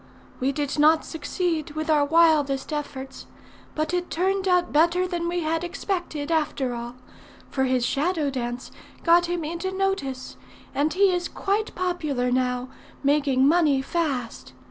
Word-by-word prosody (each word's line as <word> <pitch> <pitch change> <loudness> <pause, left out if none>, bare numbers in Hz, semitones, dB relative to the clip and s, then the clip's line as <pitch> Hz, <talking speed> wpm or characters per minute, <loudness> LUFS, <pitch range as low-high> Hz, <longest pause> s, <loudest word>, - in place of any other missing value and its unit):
We 265 +2 +1
did 290 +1 -2
not 310 +1 +5
succeed, 320 -1 -2
with 310 0 -3
our 305 -2 +4
wildest 305 -2 +3
efforts; 270 -3 -6 0.5
but 310 +2 -1
it 355 0 -1
turned 380 +3 0
out 360 -1 +2
better 340 +4 +3
than 345 -1 -2
we 350 0 -1
had 325 +1 -1
expected, 345 -4 -3
after 290 -5 0
all; 240 +1 -6 0.6
for 265 -1 +1
his 255 -2 +1
shadow 300 +1 0
dance 245 -1 -4 0.3
got 345 0 +5
him 350 -1 -2
into 340 +4 -3
notice, 380 -10 -2 0.4
and 295 +3 +1
he 390 +4 +4
is 355 -1 -1
quite 420 +2 -2
popular 305 -9 -1
now, 250 -1 +1
and 255 - -9 0.3
making 280 -2 +3
money 300 -4 +3
fast. 275 -7 -3
310 Hz, 150 wpm, -25 LUFS, 270-350 Hz, 0.6 s, not